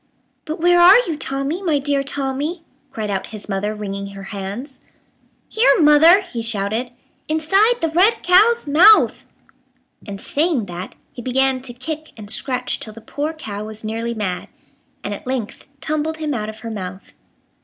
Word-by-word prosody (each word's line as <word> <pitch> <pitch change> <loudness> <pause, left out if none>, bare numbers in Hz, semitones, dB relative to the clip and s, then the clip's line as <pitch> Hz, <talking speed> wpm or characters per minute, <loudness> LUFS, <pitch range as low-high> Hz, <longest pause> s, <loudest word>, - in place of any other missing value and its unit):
"But 315 0 -5
where 350 +1 +4
are 370 +5 +9
you, 325 - -2
Tommy, 275 +4 -3
my 325 -6 +1
dear 280 0 0
Tommy?" 280 +4 -3 0.3
cried 220 -6 -4
out 195 -1 -3
his 215 -2 -10
mother, 205 +1 -2
wringing 200 -1 -5
her 195 0 -10
hands. 205 +8 -6 0.7
"Here, 460 0 +3
mother," 320 +5 +7
he 335 -12 -6
shouted, 225 +2 -1 0.4
"inside 390 +10 +2
the 325 - +1
red 365 +8 +3
cow's 425 +7 +4
mouth!" 340 +9 +5 0.8
And, 200 -1 -6
saying 295 - 0
that, 180 0 -8 0.2
he 245 - -8
began 260 +1 +1
to 255 -1 -7
kick 310 +5 -6
and 210 -1 -9
scratch 250 +2 -2
till 215 - -7
the 230 - -11
poor 290 +7 -3
cow 215 -10 -7
was 220 0 -9
nearly 230 +2 -3
mad, 190 -5 -3 0.6
and 205 - -3
at 205 - -9
length 255 -3 -4
tumbled 310 +1 -2
him 305 -2 -2
out 215 -3 -3
of 220 0 -10
her 230 - -6
mouth. 190 -2 -7
265 Hz, 165 wpm, -20 LUFS, 215-315 Hz, 0.8 s, are